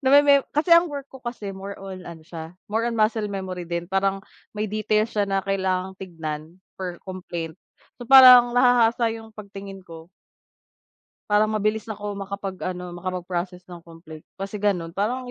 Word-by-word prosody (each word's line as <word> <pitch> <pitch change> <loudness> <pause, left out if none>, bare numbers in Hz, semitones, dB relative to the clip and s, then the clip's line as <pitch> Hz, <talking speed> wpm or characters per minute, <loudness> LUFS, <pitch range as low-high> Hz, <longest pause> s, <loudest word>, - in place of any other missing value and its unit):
nameme 280 +1 +5
kasi 310 +4 0
ang 335 +1 +7
work 285 -3 -7
ko 265 - -11
kasi 240 -5 -6
more 195 +1 -7
on 190 -2 -8
ano 165 -2 -9
siya, 160 +1 -9 0.2
more 225 +2 0
on 235 - -1
muscle 215 0 +1
memory 190 -3 -5
din, 170 +1 -4
parang 195 0 0 0.3
may 210 -1 -3
details 215 +1 +1
siya 205 -2 0
na 195 0 0
kailangang 190 -1 -1
tignan 160 -5 -5 0.4
for 180 -2 -6
complaint, 175 -3 -6 0.4
so 245 - -8
parang 250 -2 +9
nahahasa 240 -2 +4
yung 225 -1 -9
pagtingin 200 -2 -9
ko 165 -1 -12 1.2
para 210 +1 +4
mabilis 215 0 -1
ako 205 -2 -5
makapag 195 -1 -5
ano, 180 -1 -5
makapag 180 +1 -4
process 180 +1 -4
ng 175 - -8
complaint, 165 -2 -13
kasi 195 +2 -6
ganun, 190 -5 0
parang 245 +8 -2
195 Hz, 165 wpm, -24 LUFS, 180-225 Hz, 1.2 s, parang